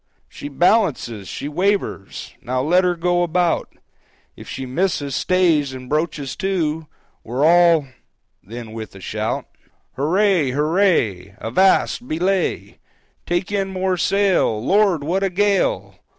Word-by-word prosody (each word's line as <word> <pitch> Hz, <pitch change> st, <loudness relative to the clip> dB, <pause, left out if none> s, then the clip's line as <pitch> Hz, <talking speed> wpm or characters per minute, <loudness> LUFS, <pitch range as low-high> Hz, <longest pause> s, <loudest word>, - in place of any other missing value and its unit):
"She 145 Hz, -, -9 dB
balances! 145 Hz, -, +1 dB
She 140 Hz, -, -5 dB
wavers! 180 Hz, -, -2 dB
Now 130 Hz, +1 st, -2 dB
let 180 Hz, +5 st, +3 dB
her 180 Hz, -1 st, +1 dB
go 175 Hz, +1 st, +1 dB
about! 175 Hz, 0 st, 0 dB, 0.6 s
If -, -, -12 dB
she 135 Hz, -, -5 dB
misses 145 Hz, -1 st, -1 dB
stays 165 Hz, -7 st, +2 dB
and 130 Hz, -1 st, -9 dB
broaches 150 Hz, -2 st, -2 dB
to, 160 Hz, -5 st, -1 dB, 0.4 s
We're 125 Hz, +6 st, -1 dB
all"—then 145 Hz, -, 0 dB
with 110 Hz, -2 st, -8 dB
a -, -, -10 dB
shout, 95 Hz, -, -3 dB, 0.5 s
"Huray! 165 Hz, -1 st, +2 dB
huray! 145 Hz, -, +1 dB
Avast! 190 Hz, -, +2 dB
belay! 180 Hz, +3 st, -1 dB, 0.5 s
Take 175 Hz, +3 st, -1 dB
in 195 Hz, -1 st, -1 dB
more 185 Hz, 0 st, -1 dB
sail! 190 Hz, -, +1 dB
Lord, 190 Hz, -, +2 dB
what 180 Hz, +6 st, -1 dB
a 195 Hz, -, +1 dB
gale! 205 Hz, -, 0 dB
170 Hz, 120 wpm, -20 LUFS, 135-190 Hz, 0.6 s, let